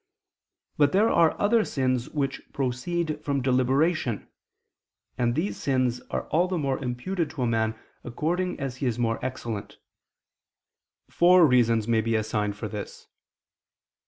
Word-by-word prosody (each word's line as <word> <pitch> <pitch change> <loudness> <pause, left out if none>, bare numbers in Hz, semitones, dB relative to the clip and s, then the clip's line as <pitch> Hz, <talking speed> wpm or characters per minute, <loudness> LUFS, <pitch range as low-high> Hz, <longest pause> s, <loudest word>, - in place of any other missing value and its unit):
But 145 -1 +3
there 210 +4 +4
are 165 -2 +3
other 220 +2 +3
sins 130 - -1
which 140 -2 -2
proceed 150 +4 -2
from 140 -1 0
deliberation: 130 - +1 0.9
and 120 -1 0
these 175 +7 -1
sins 130 -3 0
are - - -3
all 170 +4 +2
the 185 -1 -2
more 140 -4 -1
imputed 150 +7 -2
to 135 -6 -3
man 110 -1 0 0.3
according 175 +9 -2
as 135 -2 -4
he 130 - -1
is 120 -2 -1
more 115 -2 -1
excellent. 115 -5 -5 1.3
Four 180 0 +5
reasons 115 -5 +3
may 115 -1 +3
be 115 +1 0
assigned 105 -2 -1
for 110 - -4
this. 105 -1 -7
130 Hz, 135 wpm, -26 LUFS, 120-160 Hz, 1.3 s, Four